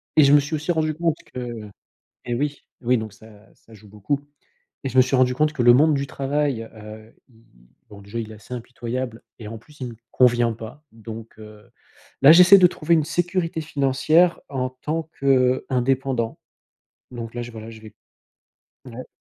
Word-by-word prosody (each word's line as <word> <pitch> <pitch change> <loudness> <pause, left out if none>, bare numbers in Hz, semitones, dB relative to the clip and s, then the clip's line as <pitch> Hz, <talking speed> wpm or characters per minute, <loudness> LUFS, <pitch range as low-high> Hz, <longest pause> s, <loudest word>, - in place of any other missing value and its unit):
et 155 - +7
je 140 - +5
me 145 - +8
suis 150 +3 -3
aussi 155 +4 -2
rendu 155 -2 0
compte 165 -1 0 0.2
que 120 -4 -6 0.6
et 120 -1 -3
oui, 145 +3 -3 0.2
oui 125 +1 +2
donc 110 -2 -5
ça 110 +2 -16 0.3
ça 110 - -20
joue 105 0 -16
beaucoup, 105 +8 -2 0.6
et 135 - -2
je 130 - -3
me 130 - +9
suis 130 +1 +1
rendu 125 0 +3
compte 150 +3 +1
que 125 - -1
le 120 - +8
monde 150 +5 +5
du 140 0 -1
travail, 140 -3 -2
heu, 110 +1 -12 0.2
il 115 - -25
il, - - -26 0.2
bon 100 -1 -13
déjà 100 +4 -6
il 110 -1 -6
est - - -10
assez 120 +4 -11
impitoyable, 120 0 -5 0.2
et 110 - -8
en 115 +1 -7
plus 150 +6 -19
il 125 - -4
me 115 - -9 0.2
convient 120 -2 +3
pas, 115 +7 -10
donc, 115 0 -10
heu, 105 +1 -14 0.5
là 140 +3 +9
j'essaie 180 +3 +9
de 180 -1 +7
trouver 170 0 0
une 155 -2 +1
sécurité 170 0 -1
financière 155 +4 +2
en 130 -2 -2
tant 155 +5 -4
qu'indépendant, 130 -2 +1 0.8
donc 115 -1 -7
là, 120 - -4
je, 120 0 -9
voilà 110 0 -9
je 110 -1 -12
vais 110 -1 -13 0.9
ouais. 125 +1 -9
125 Hz, 195 wpm, -22 LUFS, 115-150 Hz, 0.9 s, me